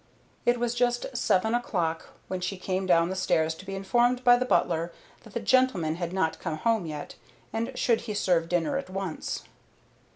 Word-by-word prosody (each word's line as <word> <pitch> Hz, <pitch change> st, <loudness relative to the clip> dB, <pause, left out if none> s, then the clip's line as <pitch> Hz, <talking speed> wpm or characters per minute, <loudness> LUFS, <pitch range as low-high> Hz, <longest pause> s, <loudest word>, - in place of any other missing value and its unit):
It 240 Hz, 0 st, +4 dB
was 240 Hz, -1 st, 0 dB
just 245 Hz, +1 st, 0 dB
seven 220 Hz, -2 st, +2 dB
o'clock 175 Hz, -9 st, -1 dB, 0.2 s
when 185 Hz, -1 st, -3 dB
she 190 Hz, +2 st, -2 dB
came 185 Hz, +1 st, -2 dB
down 170 Hz, -1 st, +4 dB
the -, -, -2 dB
stairs 160 Hz, -4 st, +1 dB
to 190 Hz, +4 st, -13 dB
be 195 Hz, -, -4 dB
informed 240 Hz, +6 st, +2 dB
by 245 Hz, -1 st, +8 dB
the 250 Hz, +1 st, 0 dB
butler 170 Hz, -6 st, +1 dB, 0.3 s
that 220 Hz, -, -15 dB
the -, -, +1 dB
gentlemen 215 Hz, -9 st, +2 dB
had 175 Hz, -1 st, -3 dB
not 160 Hz, -4 st, 0 dB
come 165 Hz, -3 st, -3 dB
home 225 Hz, -1 st, +1 dB
yet, 150 Hz, -2 st, -6 dB, 0.4 s
and 230 Hz, +3 st, -1 dB
should 235 Hz, -2 st, +2 dB
he 220 Hz, -3 st, -5 dB
serve 175 Hz, -4 st, +1 dB
dinner 175 Hz, -, +1 dB
at 275 Hz, -, -8 dB
once? 185 Hz, -3 st, -4 dB
195 Hz, 190 wpm, -27 LUFS, 170-240 Hz, 0.4 s, by